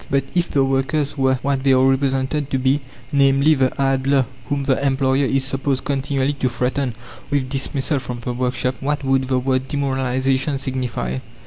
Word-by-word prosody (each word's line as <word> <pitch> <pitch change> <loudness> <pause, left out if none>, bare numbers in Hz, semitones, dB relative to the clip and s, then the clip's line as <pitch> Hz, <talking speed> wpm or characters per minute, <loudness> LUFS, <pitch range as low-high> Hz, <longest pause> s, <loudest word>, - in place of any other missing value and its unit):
But 135 -1 +2
if 175 -1 +1
the 140 - +2
workers 135 +2 0
were 135 -2 +2
what 140 -1 0
they 135 0 +3
are 130 0 +4
represented 135 +2 +1
to 135 - 0
be 130 +3 +1 0.3
namely, 140 +1 +4
the 130 -3 +2
idler 135 0 +2 0.2
whom 140 -1 0
the 135 0 +1
employer 135 0 +2
is 135 0 +1
supposed 135 0 -1
continually 140 0 0
to 130 -2 -1
threaten 125 +1 -1 0.3
with 140 -3 0
dismissal 135 +1 -1
from 125 -2 -6
the 125 +1 -3
workshop 125 +1 -1
what 145 +1 -2
would 135 -1 +1
the 130 -1 +1
word 130 0 0
"demoralization" 135 0 0
signify? 125 - -3
135 Hz, 175 wpm, -20 LUFS, 130-140 Hz, 0.3 s, are